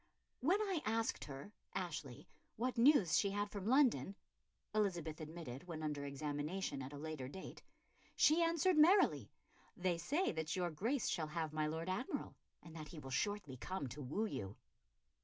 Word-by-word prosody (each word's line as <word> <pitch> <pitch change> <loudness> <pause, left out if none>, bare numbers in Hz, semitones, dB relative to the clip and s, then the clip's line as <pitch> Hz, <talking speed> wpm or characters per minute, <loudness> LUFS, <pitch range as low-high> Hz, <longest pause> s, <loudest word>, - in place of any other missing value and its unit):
"When 345 +10 +3
I 385 -7 0
asked 225 +1 0
her 140 +7 -8 0.2
[Ashley] 150 -7 -4 0.3
what 250 +3 -1
news 235 - +6
she 200 - +2
had 205 +1 -1
from 200 -1 -4
London," 255 -6 +4 0.6
Elizabeth 175 -7 0
admitted 155 -1 -7
when 160 -2 -5
under 145 -2 -2
examination 145 +3 -3
at 130 +1 -6
a 145 - -7
later 150 -3 -4
date, 190 +8 -8 0.5
"she 315 +3 +5
answered 335 0 +3
merrily 305 - +5 0.5
'They 180 -2 +1
say 295 - +1
that 160 -1 -2
your 175 -2 0
Grace 230 - 0
shall 160 -3 0
have 155 0 -3
my 155 0 +1
Lord 160 +2 -3
Admiral, 190 +8 -2 0.3
and 165 -1 -11
that 155 -2 -6
he 165 - -10
will 135 -3 -7
shortly 185 -2 -1
come 185 +4 -3
to 150 - -7
woo 150 - -1
you. 105 - -4
170 Hz, 165 wpm, -38 LUFS, 150-220 Hz, 0.6 s, news